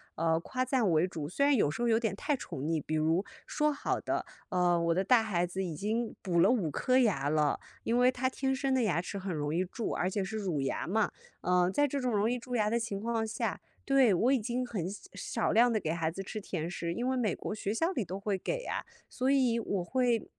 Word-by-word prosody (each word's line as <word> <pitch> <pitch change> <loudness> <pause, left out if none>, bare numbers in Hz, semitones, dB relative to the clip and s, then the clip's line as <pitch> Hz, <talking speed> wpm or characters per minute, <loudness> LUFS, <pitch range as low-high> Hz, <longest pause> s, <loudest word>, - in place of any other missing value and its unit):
呃， 165 0 +2
夸 255 +8 -2
赞 250 -7 +1
为 160 +3 +3
主。 155 -5 -5
虽 280 - -1
然 285 -1 +5
有 150 -10 +2
时 235 - -5
候 240 - +2
有 225 0 +4
点 225 -4 -1
太 290 +7 0
宠 145 - -7
溺， 160 +1 0
比 155 - -3
如， 160 +5 +2 0.2
说 300 -1 +1
好 - - -1
的 - - -2 0.3
呃， 175 -1 +2
我 170 0 +2
的 190 +3 +1
大 225 +2 +5
孩 180 -5 0
子 190 +2 -3
已 170 -3 -3
经 220 +5 -2
补 175 -3 +1
了 200 - +6
5 195 -11 +1
颗 255 - +2
牙 180 - +2
了， 150 -2 +2 0.3
因 235 +1 +1
为 250 +1 +5
他 255 +1 0
天 265 0 -1
生 270 0 0
的 255 -2 +2
牙 175 -5 +1
齿 200 - -6
很 190 -2 -3
容 150 +1 -2
易 180 - +2
蛀， 220 +5 -4
而 180 - 0
且 200 +1 -1
是 220 +3 -4
乳 180 -8 -1
牙 135 - -2
嘛。 215 +3 +1 0.3
呃， 180 0 +3
在 290 +6 +3
这 280 +1 -2
种 250 -1 0
容 210 +1 +2
易 250 - 0
蛀 250 +1 -5
牙 210 -2 +2
的 235 - +1
情 210 -4 -3
况 225 0 -1
下 215 - -2 0.3
对， 265 -6 +5
我 235 +9 +3
已 265 - +3
经 245 +3 -2
很 195 -8 -3
少 200 - -10
少 200 - -1
量 240 +2 +5
地 215 - +2
给 160 -3 -2
孩 165 -1 -1
子 195 - -6
吃 215 +3 -5
甜 170 -3 -4
食， 170 -1 -3
因 245 +6 -2
为 260 - +1
美 220 -6 +1
国 215 - -5
学 205 0 -2
校 330 +10 +1
里 240 - -1
都 190 +3 -5
会 200 -1 -1
给 - - -3
呀。 - - -3 0.2
所 255 +1 -1
以 255 -4 +3
我 200 -5 -2
会 245 +2 0
210 Hz, 275 characters per minute, -31 LUFS, 175-245 Hz, 0.3 s, 了